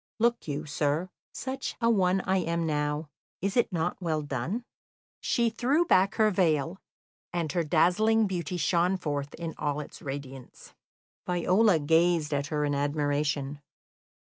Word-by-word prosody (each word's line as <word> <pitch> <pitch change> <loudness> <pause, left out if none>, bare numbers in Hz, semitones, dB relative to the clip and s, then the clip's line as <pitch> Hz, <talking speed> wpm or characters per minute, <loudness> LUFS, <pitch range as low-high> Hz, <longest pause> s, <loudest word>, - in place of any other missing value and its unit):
Look 235 -2 +1
you, 150 +1 -3
sir, 150 +4 -1 0.2
such 260 0 -4
a 230 - +2
one 190 -3 +2
I 190 +1 +1
am 170 -2 -1
now. 150 0 -1 0.3
Is 195 +2 -2
it 240 -3 +2
not 175 +2 -2
well 160 -3 -1
done?" 145 - -3 0.5
She 235 -2 +1
threw 270 +9 +2
back 195 - +3
her 215 -1 +4
veil, 170 -1 +1 0.5
and 170 -3 -2
her 175 -2 0
dazzling 195 +8 +3
beauty 180 -3 -3
shone 175 +3 +2
forth 145 -4 -3
in 165 -1 -5
all 145 -1 -1
its 150 - -9
radiance. 135 -2 -8 0.5
Viola 180 +3 +3
gazed 160 0 +2
at 140 0 -1
her 150 -1 -1
in 145 - 0
admiration. 145 0 -1
165 Hz, 145 wpm, -28 LUFS, 150-190 Hz, 0.5 s, her